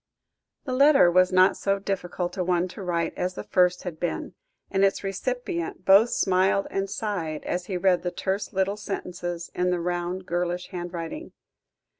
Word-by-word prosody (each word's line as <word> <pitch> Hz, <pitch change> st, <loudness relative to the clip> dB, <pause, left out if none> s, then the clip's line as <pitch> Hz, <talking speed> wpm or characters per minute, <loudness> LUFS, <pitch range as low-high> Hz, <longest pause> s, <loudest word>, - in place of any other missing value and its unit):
The 260 Hz, -, -4 dB
letter 275 Hz, -8 st, +6 dB
was 185 Hz, +1 st, +4 dB
not 185 Hz, +1 st, +5 dB
so 195 Hz, 0 st, 0 dB
difficult 180 Hz, -2 st, -3 dB
a 185 Hz, -, -1 dB
one 180 Hz, 0 st, +1 dB
to 190 Hz, -, -9 dB
write 170 Hz, -3 st, -1 dB
as 180 Hz, 0 st, -2 dB
the -, -, -5 dB
first 180 Hz, -1 st, +2 dB
had 170 Hz, -4 st, -6 dB
been, 175 Hz, -2 st, -3 dB, 0.4 s
and 195 Hz, 0 st, +2 dB
its 195 Hz, +1 st, +2 dB
recipient 195 Hz, -4 st, -3 dB
both 200 Hz, +5 st, +7 dB
smiled 190 Hz, 0 st, +2 dB
and 195 Hz, 0 st, -2 dB
sighed, 180 Hz, -8 st, -3 dB
as 180 Hz, 0 st, -3 dB
he 185 Hz, -, -2 dB
read 180 Hz, -1 st, +3 dB
the 180 Hz, -, -2 dB
terse 190 Hz, +3 st, -3 dB
little 195 Hz, 0 st, 0 dB
sentences 175 Hz, -4 st, -5 dB
in 180 Hz, 0 st, 0 dB
the 180 Hz, -1 st, 0 dB
round, 175 Hz, +1 st, -3 dB
girlish 175 Hz, +1 st, -2 dB
handwriting. 175 Hz, -, -6 dB
180 Hz, 170 wpm, -26 LUFS, 175-195 Hz, 0.4 s, both